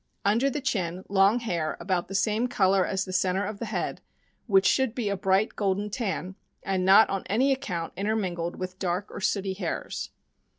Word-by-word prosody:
Under 230 +7 +3
the 290 +1 -3
chin, 185 - -2
long 200 +4 +4
hair 170 -9 -2
about 185 -3 -1
the 195 - -6
same 215 +4 +1
color 195 -5 +2
as 190 0 -1
the 185 - -7
center 185 +1 +1
of 205 0 -5
the 230 - -3
head, 215 - -3 0.5
which 195 -3 +4
should 265 0 +2
be 230 -5 -1
a 200 - 0
bright 195 +2 +1
golden 205 0 -1
tan, 195 -5 -3 0.3
and 190 -1 0
not 195 +4 +7
on 195 -1 -1
any 255 +8 +2
account 180 -11 -3
intermingled 185 -4 -2
with 185 0 -6
dark 185 +1 -2
or - - -7
sooty 195 0 0
hairs. 185 -3 -4
195 Hz, 185 wpm, -27 LUFS, 185-215 Hz, 0.5 s, not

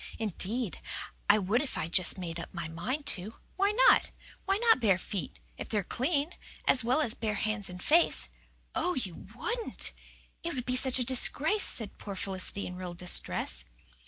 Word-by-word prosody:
"Indeed, 220 +1 0 0.5
I 205 - +7
would 210 +5 +1
if 285 - -5
I - - -2
just 180 +2 +3
made 170 -2 -6
up - - -8
my 170 -2 -4
mind 245 - -4
to. 215 -5 +4 0.2
Why 395 +1 +2
not? - - +4 0.4
Why 390 0 +1
not 460 - +4
bare 205 -6 +3
feet 185 -4 -5 0.2
if - - -7
they're 210 -2 0
clean 285 - -1 0.3
as 255 - +4
well 255 +6 +2
as 235 -7 +1
bare 215 -3 -3
hands 215 -1 -1
and 180 0 -9
face?" 335 +3 +3 0.5
"Oh, 360 - -1
you 190 -10 -6
wouldn't! 465 0 -2 0.5
It 340 -2 -4
would 250 -2 -4
be 250 - -1
such 255 0 +4
a 250 - +2
disgrace!" 285 - +3
said 220 -4 -3
poor 200 - -7
Felicity 190 +1 -2
in 180 - -7
real 180 -1 -6
distress. 115 - +2
220 Hz, 180 wpm, -29 LUFS, 185-285 Hz, 0.5 s, I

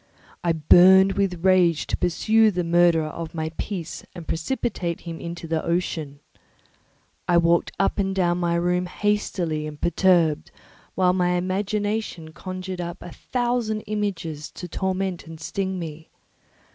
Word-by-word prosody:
I 170 - +2
burned 185 +5 +6
with 190 -3 -1
rage 180 -4 +4
to - - -1
pursue 220 +5 +3
the 180 -3 -1
murderer 170 -1 +3
of 165 +1 -7
my 160 0 -2
peace 180 -6 -5
and 170 -2 -9
precipitate 170 -1 -2
him 165 -1 -7
into 170 0 -6
the 160 -1 -1
ocean. 160 -4 -2 1.1
I 175 - +4
walked 170 0 +3
up 195 - +1
and 195 -1 0
down 175 -2 +1
my 170 -1 +1
room 180 +1 +1
hastily 175 -6 -1
and 150 -1 -9
perturbed, 170 -3 +2 0.5
while 180 -1 +3
my 180 -1 +1
imagination 195 -2 -2
conjured 185 +1 -6
up 175 0 -6
a 175 - -9
thousand 240 -3 -1
images 190 -8 -3
to 180 - -7
torment 190 -1 -2
and 160 -1 -10
sting 190 +3 -3
me. 160 -2 -7
175 Hz, 145 wpm, -24 LUFS, 165-190 Hz, 1.1 s, burned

